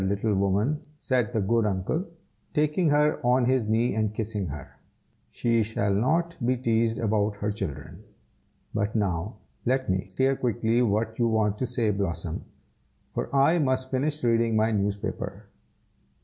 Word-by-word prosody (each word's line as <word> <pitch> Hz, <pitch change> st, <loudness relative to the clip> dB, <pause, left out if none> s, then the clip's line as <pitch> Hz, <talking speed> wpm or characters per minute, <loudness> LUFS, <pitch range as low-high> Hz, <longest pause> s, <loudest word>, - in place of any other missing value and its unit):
little 100 Hz, +3 st, 0 dB
woman," 100 Hz, +9 st, +1 dB, 0.2 s
said 125 Hz, -6 st, 0 dB
the 115 Hz, -, 0 dB
good 115 Hz, +3 st, +2 dB
uncle, 105 Hz, -, -1 dB, 0.5 s
taking 150 Hz, +2 st, +2 dB
her 150 Hz, 0 st, +2 dB
on 125 Hz, +1 st, +3 dB
his 130 Hz, -3 st, +2 dB
knee 115 Hz, +3 st, +2 dB
and 110 Hz, -1 st, -1 dB
kissing 105 Hz, -3 st, -2 dB
her; 70 Hz, -2 st, -8 dB, 0.5 s
"she 115 Hz, -1 st, +1 dB
shall 105 Hz, -2 st, 0 dB
not 165 Hz, +11 st, +1 dB
be 125 Hz, +2 st, +2 dB
teased 115 Hz, -2 st, +1 dB
about 105 Hz, -1 st, +1 dB
her 105 Hz, +1 st, -2 dB
children. 95 Hz, -9 st, -6 dB, 0.7 s
But 105 Hz, +1 st, -1 dB
now 100 Hz, 0 st, -1 dB, 0.3 s
let 130 Hz, -3 st, +1 dB
me 95 Hz, 0 st, -2 dB
hear 135 Hz, +1 st, +3 dB
quickly 120 Hz, -1 st, +1 dB
what 110 Hz, 0 st, 0 dB
you 120 Hz, -, +3 dB
want 105 Hz, -2 st, +1 dB
to 130 Hz, -, 0 dB
say, 115 Hz, -3 st, 0 dB
Blossom, 85 Hz, -5 st, -3 dB, 0.7 s
for -, -, -2 dB
I 140 Hz, +5 st, +4 dB
must 130 Hz, -2 st, 0 dB
finish 145 Hz, +3 st, -1 dB
reading 115 Hz, -1 st, +2 dB
my 110 Hz, +1 st, +3 dB
newspaper." 100 Hz, -1 st, -2 dB
115 Hz, 150 wpm, -26 LUFS, 100-130 Hz, 0.7 s, I